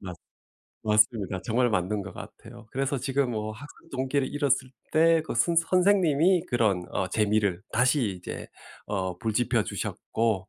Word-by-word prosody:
맞 90 -3 -7 0.7
맞습니다, 105 -3 +2
정말 120 +2 +2
맞는 100 0 0
것 100 0 -9
같아요. 115 +3 -11
그래서 135 +1 -1
지금 135 0 0
뭐 110 -1 -3
학습동기를 135 +2 -3
잃었을 140 -3 +1 0.2
때 165 +1 +5
그 155 - -5
선 170 +9 +2
선생님이 180 -1 +3
그런 105 -8 +1
어 95 - -1
재미를 105 -2 +1
다시 125 -1 +2
이제 90 - -7 0.4
어 95 -3 -3
불 110 +2 -2
지펴 120 0 +2
주셨고 110 -5 -2
115 Hz, 290 characters per minute, -27 LUFS, 105-140 Hz, 0.7 s, 때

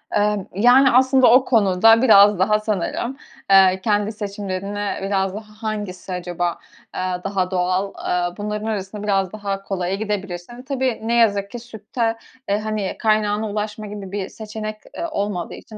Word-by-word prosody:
Emm, 205 -1 +1
yani 245 +6 +6
aslında 260 -1 +5
o 255 +2 +6
konuda 225 0 +4
biraz 205 -5 +6
daha 210 +3 +3
sanırım, 215 +5 -2 0.3
eee, 190 -1 +6
kendi 210 -1 +1
seçimlerine 200 -1 -4
biraz 195 -1 0
daha 210 +1 -9
hangisi 205 -4 -4
acaba, 175 -1 -3 0.4
eee, - - -2 0.2
daha 195 -2 -1
doğal, 185 +2 0
eee, 175 +1 -2
bunların 210 +1 -4
arasında 205 -1 -4
biraz 195 -3 0
daha 200 -2 -4
kolaya 190 -1 -2
gidebilirsin. 200 +1 -5
Tabii 260 -3 -1
ne 230 +1 -1
yazık 205 -4 +2
ki 240 - -6
sütte, 225 0 -3 0.3
e, 200 +1 +1
hani 215 -2 -3
kaynağına 215 -1 +1
ulaşma 210 +1 -4
gibi 200 -2 -8
bir 195 -1 -4
seçenek, 215 0 -6 0.2
eee, 335 - -2
olmadığı 200 - -3
için 215 - -11
205 Hz, 150 wpm, -21 LUFS, 195-220 Hz, 0.4 s, yani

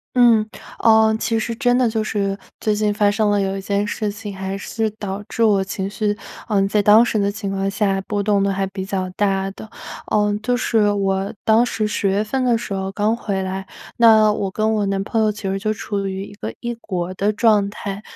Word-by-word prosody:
嗯， 235 -3 +5 0.4
哦 220 -1 +5
其 225 - 0
实 230 +1 -2
真 245 +1 +2
的 250 - +3
就 220 -1 -1
是 200 -2 -1 0.2
最 215 -1 0
近 210 0 +1
发 205 0 +2
生 210 0 +1
了 205 -1 +2
有 195 0 -1
一 - - -4
件 200 +1 -1
事 210 0 -2
情 205 -1 -7
还 190 +1 -4
是 220 +1 -2
导 200 0 -4
致 230 - 0
我 205 -3 +4
情 195 0 -4
绪， 205 0 -1 0.3
嗯 195 -2 +2
在 210 0 +2
当 215 +3 +7
时 235 - -1
的 200 -1 +1
情 205 -1 -5
况 195 0 -1
下， 195 -1 0
波 205 -1 -1
动 200 -1 +2
得 200 0 +1
还 195 0 -1
比 190 0 -5
较 190 -1 -2
大 195 0 0
的。 215 +2 -11 0.4
嗯， 210 -1 +2
就 245 +2 +1
是 220 -4 +2
我 195 -1 -1
当 225 +2 +4
时 225 -3 -1
十 205 -1 -1
月 200 +3 +1
份 260 +4 -1
的 240 -2 +3
时 205 -3 -5
候 190 0 -3
刚 210 +3 0
回 200 -5 -3
来， 190 +1 -5 0.3
那 220 -2 +6
我 200 -2 -2
跟 220 +3 0
我 210 -1 +1
男 195 0 -1
朋 225 +1 0
友 215 - +3
其 210 +1 -8
实 195 - -1
就 215 +1 0
处 205 -2 -4
于 190 +1 -4
一 205 - -12
个 110 - -6
异 240 0 -4
国 185 -2 -4
的 205 +3 0
状 210 -3 +3
态。 205 0 -6
205 Hz, 250 characters per minute, -20 LUFS, 195-220 Hz, 0.4 s, 当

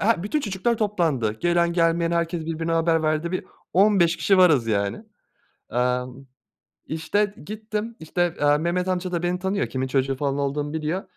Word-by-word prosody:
he 210 -4 +2
bütün 210 +10 -1
çocuklar 220 0 -1
toplandı. 165 - 0
Gelen 170 0 +2
gelmeyen 165 0 +2
herkes 170 -1 -1
birbirine 165 0 -2
haber 165 0 +2
verdi. 155 +2 0
Bir 185 - -2 0.3
15 185 -3 +4
kişi 195 -2 +3
varız 155 -10 +5
yani. 100 - -1 0.7
Emm, 125 +2 -1 0.6
işte, 190 +6 -1
gittim, 215 +1 -5
işte, 175 +2 -1
eee, 145 0 +4
Mehmet 175 +3 -1
Amca 185 0 -2
da 175 -1 -1
beni 175 +1 0
tanıyor, 190 +2 -1
kimin 130 0 -3
çocuğu 135 0 0
falan 140 0 -1
olduğumu 145 +1 -2
biliyor. 160 +4 -2
170 Hz, 160 wpm, -24 LUFS, 145-185 Hz, 0.7 s, varız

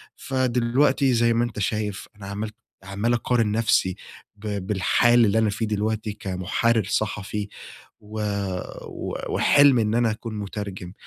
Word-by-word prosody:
فدلوقتي 130 +1 +1
زي 115 0 +3
ما 120 +1 +2
أنت 120 -3 -4
شايف 105 -1 -2
أنا 100 -1 -10
عملت 105 +2 -5 0.3
عمّال 100 +5 -1
اقارن 120 -2 +1
نفسي 105 -4 +2 0.4
ب 105 +1 -9 0.2
بالحال 115 +5 +4
اللي 105 +1 +2
أنا 110 -1 +3
فيه 110 +3 -2
دلوقتي 110 0 -1
كمحرر 100 +4 0
صحفي 105 +1 -2 0.5
و 105 +1 -7 0.7
و - - -6
وحلم 140 -3 +5
إن 110 0 +1
أنا 120 -2 +3
أكون 115 0 -6
مترجم، 100 -3 -6
110 Hz, 135 wpm, -24 LUFS, 100-120 Hz, 0.7 s, وحلم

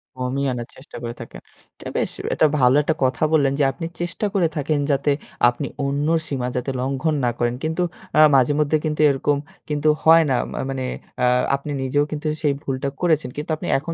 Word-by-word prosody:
কমিয়ে 130 +2 -2
আনার 120 -1 -5
চেষ্টা 130 - -12
করে 120 0 -4
থাকেন। - - -10 0.4
এটা - - -9
বেশ - - 0 0.2
এটা - - +3
ভালো 125 +1 +5
একটা 155 +1 0
কথা 130 +4 +1
বললেন 140 -3 +3
যে - - +4
আপনি 165 +4 -6 0.2
চেষ্টা 175 +4 -2
করে 180 -4 +3
থাকেন 150 +1 0
যাতে 140 +1 +2 0.4
আপনি 130 +3 -4 0.2
অন্যর 145 +4 +1
সীমা 130 -4 -2
যাতে 125 +2 -2
লঙ্ঘন 135 +4 0
না 120 - +2
করেন। 120 0 0
কিন্তু 160 +3 0 0.4
আ - - +9
মাঝেমধ্যে 145 +4 +3
কিন্তু 150 0 -1
এইরকম 140 +1 +1 0.3
কিন্তু 150 0 +1
হয় 165 0 +7
না। 130 - +2 0.2
মা - - -4
মানে 130 -1 -3 0.4
আ - - +5 0.3
আপনি 140 +2 -6
নিজেও 135 +2 +1
কিন্তু 150 +1 -3
সেই 150 -3 +2
ভুলটা 135 0 -2
করেছেন। 155 -7 +2
কিন্তু 150 +3 -5
আপনি 155 - -7
এখন 165 +4 -5
145 Hz, 195 wpm, -22 LUFS, 130-155 Hz, 0.4 s, আ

